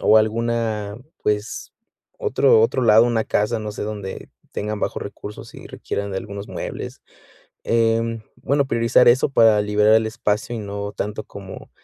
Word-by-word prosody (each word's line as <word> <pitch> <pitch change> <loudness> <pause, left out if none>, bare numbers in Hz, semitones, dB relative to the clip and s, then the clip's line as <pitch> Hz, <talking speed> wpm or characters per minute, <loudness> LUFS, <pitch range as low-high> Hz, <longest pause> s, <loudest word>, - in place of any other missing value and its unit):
o 110 - +5
alguna, 110 -1 -1 0.3
pues, 105 +1 -2 0.5
otro 455 0 +4
otro 460 - +1
lado, 110 0 +6
una 115 -2 +1
casa, 105 +2 0
no 105 -1 -5
sé, - - -6
donde 105 -2 -6 0.2
tengan 105 0 -3
bajos - - -2
recursos 100 +1 -9
y - - -10
requieran 100 0 -4
de - - -3
algunos 100 0 -7
muebles. - - -6 0.6
Em, 115 0 +1 0.2
bueno, 140 0 +1
priorizar 115 0 +4
eso 125 +2 +4
para 110 -5 +5
liberar 105 +1 +3
el 110 0 +3
espacio 110 +1 -2
y - - -3
no 100 0 -5
tanto 105 +1 -4
como 95 -1 -10
110 Hz, 155 wpm, -22 LUFS, 105-115 Hz, 0.6 s, lado